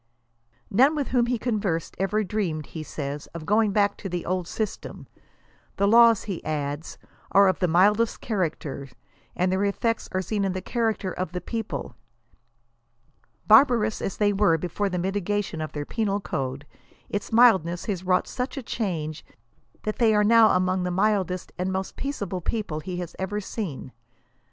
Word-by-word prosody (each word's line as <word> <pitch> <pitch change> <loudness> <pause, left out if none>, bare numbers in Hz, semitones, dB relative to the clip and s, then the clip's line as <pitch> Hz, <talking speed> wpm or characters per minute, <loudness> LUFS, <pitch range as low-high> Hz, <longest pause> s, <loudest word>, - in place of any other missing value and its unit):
None 265 +9 +5
with 290 -3 -2
whom 245 -2 +2
he 245 0 0
conversed, 205 -8 -2
ever 205 +3 +1
dreamed 180 -7 -2
he 160 - -7
says, 145 -1 -5
of 160 -2 -6
going 210 +2 +3
back 205 0 +2
to 195 - -6
the 175 -1 -3
old 180 -1 -1
system. 215 +1 -5 0.7
The 200 - +3
laws, 230 0 +6
he 195 -5 -5
adds, 145 0 -4 0.4
are 200 0 +7
of 185 - +1
the 180 - +2
mildest 205 +7 +3
character, 160 - -3 0.5
and 180 +1 +1
their 190 +1 +1
effects 225 +3 -1
are 185 0 -1
seen 205 +3 -1
in 190 -1 0
the 185 - -4
character 225 -5 -1
of 180 -2 -4
the 180 - -2
people. 225 +2 -5 1.5
Barbarous 220 -1 +5
as 195 - -3
they 205 -1 +2
were 195 -5 +3
before 180 +5 -2
the 180 - -2
mitigation 195 -1 -2
of 155 - -4
their 145 -1 -4
penal 205 0 -1
code, 135 -6 -4 0.4
its 205 +2 -4
mildness 190 -8 +4
has 190 -4 -3
wrought 185 0 +2
such 255 +2 -4
a 270 - -4
change 165 -10 -3 0.6
that 215 - -3
they 225 -3 +4
are 210 - +4
now 225 0 +6
among 185 0 +1
the 180 - -1
mildest 185 -1 0
and 185 +1 -1
most 190 0 -3
peaceable 200 -10 -4
people 205 -7 -3
he 180 +3 -5
has 175 -2 -6
ever 190 +2 -2
seen. 190 - -5
195 Hz, 170 wpm, -25 LUFS, 175-215 Hz, 1.5 s, are